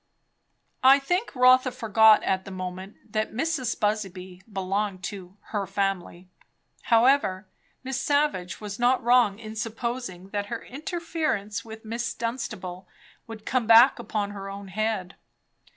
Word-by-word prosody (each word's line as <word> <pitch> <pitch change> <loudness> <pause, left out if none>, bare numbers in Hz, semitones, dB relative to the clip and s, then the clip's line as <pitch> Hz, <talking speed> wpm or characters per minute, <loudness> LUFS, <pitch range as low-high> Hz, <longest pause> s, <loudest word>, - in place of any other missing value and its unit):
I 265 +1 +8
think 355 - -2
Rotha 255 +1 +5
forgot 220 -3 +5
at 190 0 0
the 195 - -10
moment 185 +1 -6 0.2
that 215 0 -1
Mrs. 260 -2 -1
Busby 190 -4 -2
belonged 195 0 -2
to 190 0 -7
"her 205 -3 -2
family." 195 -2 -2 0.6
However, 230 -5 +3 0.4
Miss 265 0 -3
Savage 285 -12 0
was 210 0 -7
not 245 +1 +3
wrong 240 -4 +4
in 220 -1 -9
supposing 225 -4 -4
that 205 0 -3
her 235 +1 -6
interference 310 - -3
with 220 0 -11
Miss 230 +1 -3
Dunstable 215 -6 -5 0.4
would 220 -1 -10
come 255 -4 0
back 235 +3 +7
upon 210 -3 -3
her 195 -1 -7
own 200 0 -8
head. 210 -2 -2
215 Hz, 135 wpm, -26 LUFS, 195-245 Hz, 0.6 s, I